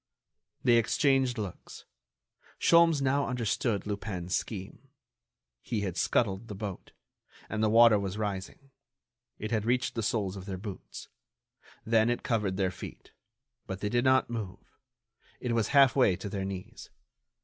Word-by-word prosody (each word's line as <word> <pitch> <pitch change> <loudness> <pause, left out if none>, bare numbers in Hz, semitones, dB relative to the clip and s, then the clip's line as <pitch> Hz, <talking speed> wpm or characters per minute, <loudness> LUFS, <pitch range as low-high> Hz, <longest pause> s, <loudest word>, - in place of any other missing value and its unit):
They 120 -2 +5
exchanged 130 +1 +2
looks. 100 -5 -7 0.7
Sholmes 165 -4 +5
now 140 +1 +1
understood 115 -4 -1
Lupin's 95 -3 -3
scheme: 95 -4 -5 0.7
he 110 -3 -3
had 95 -4 -3
scuttled 100 +1 0
the 105 - -7
boat. 100 -2 -7 0.5
And 110 - -3
the 110 - +3
water 115 -1 +6
was 100 0 -4
rising. 105 +6 -5 0.7
It 110 +1 -5
had 110 -3 +1
reached 125 +3 0
the 115 - -2
soles 105 -4 -1
of 95 0 -9
their 95 -2 -4
boots. 100 0 -8 0.8
Then 110 0 +3
it 120 - -1
covered 105 -5 0
their 95 -2 +1
feet; - - -10 0.6
but 95 0 -5
they 105 - -1
did 120 +2 +1
not 130 0 +4
move. 110 -6 -7 0.6
It 120 - -2
was 115 -2 +1
half 140 -2 +5
way 125 -9 +4
to 100 - -6
their 95 0 -3
knees. 95 -1 -7
110 Hz, 150 wpm, -29 LUFS, 95-120 Hz, 0.8 s, water